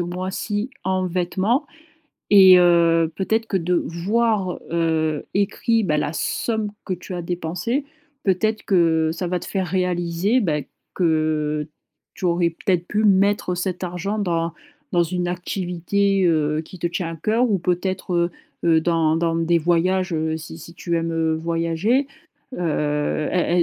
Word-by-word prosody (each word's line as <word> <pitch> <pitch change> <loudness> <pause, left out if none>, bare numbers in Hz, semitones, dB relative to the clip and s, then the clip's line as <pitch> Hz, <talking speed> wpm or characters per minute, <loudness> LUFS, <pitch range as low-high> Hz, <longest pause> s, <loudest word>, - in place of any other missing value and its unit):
mois-ci, 185 +6 -3
en 185 0 0
vêtements? 185 - 0 0.6
Et 190 -2 +9
heu, 170 -2 +4
peut-être 220 +5 0
que 195 - 0
de 180 +1 0
voir, 195 +3 0
heu, 160 -2 0
écrit, 220 +3 +1
bah, 150 -6 +1
la 150 - -1
somme 220 +4 -1 0.2
que 185 - -1
tu 180 +1 -8
as 175 - -3
dépensée, 175 - -2 0.4
peut-être 215 +3 +1
que 165 -4 +3
ça 175 +2 -4
va 180 +1 -1
te - - -9
faire 190 -2 -2
réaliser, 180 +4 0
bah, 155 -8 0 0.3
que 155 -3 0 0.5
tu - - -8
aurais 170 -1 +2
peut-être 175 +1 -1
pu 210 +1 0
mettre 200 -2 +3
cet 180 +1 -3
argent 180 +4 -3
dans 170 -4 -1 0.4
dans 175 -1 +4
une 180 +1 -2
activité, 180 +2 -1
heu, 155 -2 +2
qui 185 - -12
te 170 - -1
tient 170 0 -3
à 165 - -6
cœur 225 +8 +1
ou 200 - +2
peut-être, 180 +1 -2
heu 170 0 +2 0.3
heu, 165 -1 +4
dans 165 -1 +2
dans 165 0 0
des 165 +1 +2
voyages, 175 +3 +1
heu, 160 0 -1
si 160 0 -9
si 170 +1 -11
tu 170 0 -2
aimes, 165 0 -1
heu, 160 -1 +1
voyager. 165 - 0 0.5
Heu, 150 -3 -1
est 175 -1 +2
175 Hz, 155 wpm, -22 LUFS, 165-190 Hz, 0.6 s, Et